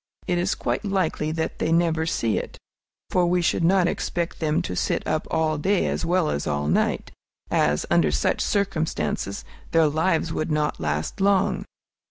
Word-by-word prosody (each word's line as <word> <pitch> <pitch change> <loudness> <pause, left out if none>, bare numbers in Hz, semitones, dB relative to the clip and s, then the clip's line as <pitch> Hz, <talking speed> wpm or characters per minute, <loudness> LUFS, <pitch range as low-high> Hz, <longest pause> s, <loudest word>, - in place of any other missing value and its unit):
It 175 -1 0
is 180 +3 0
quite - - -2
likely 185 -6 0
that 160 0 -3
they - - 0
never 165 -1 +2
see 115 -9 0
it; - - -8 0.5
for 180 -1 +3
we 180 +1 +2
should 170 0 +1
not 180 +1 +4
expect 170 -1 -2
them 155 -2 +1
to 90 - -4
sit - - -1
up - - -1
all 155 -2 0
day 195 +5 +2
as - - -1
well 175 -2 +1
as 70 - -2
all 75 0 -1
night, 80 - 0 0.4
as, 75 0 +2
under 85 -3 +4
such 65 -4 0
circumstances, 160 - -1 0.3
their 165 -1 +5
lives 160 +2 +1
would 155 - -2
not 150 -1 0
last 75 - -2
long. 195 -1 +2
160 Hz, 175 wpm, -24 LUFS, 150-180 Hz, 0.5 s, their